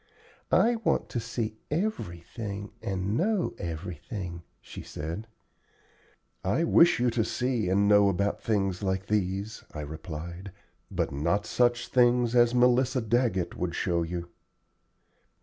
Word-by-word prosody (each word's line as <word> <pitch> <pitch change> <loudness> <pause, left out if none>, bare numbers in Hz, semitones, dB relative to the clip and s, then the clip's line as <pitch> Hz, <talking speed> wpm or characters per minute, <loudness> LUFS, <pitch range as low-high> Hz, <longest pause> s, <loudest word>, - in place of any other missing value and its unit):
"I 235 +1 +4
want 225 - 0
to 120 - -2
see 115 -1 -3
everything 105 - -3
and 95 +1 -2
know 195 - +1
everything," 85 +2 -5 0.2
she - - -9
said. 85 +9 -6 1.2
"I 100 - +1
wish 170 -2 +5
you 120 0 +2
to 115 -1 +1
see 120 -4 -1
and 100 +2 +3
know 105 -1 +6
about 100 +2 0
things 95 -4 0
like 95 -1 -1
these," 100 +1 -1
I 75 - -3
replied, 80 +5 -7 0.4
"but - - -1
not 85 +9 0
such 120 -1 +2
things 120 -1 +3
as 120 0 +5
Melissa 125 +1 +4
Daggett 115 -5 0
would 85 -1 -3
show 85 -2 0
you." 85 +1 -4
100 Hz, 130 wpm, -28 LUFS, 90-120 Hz, 1.2 s, know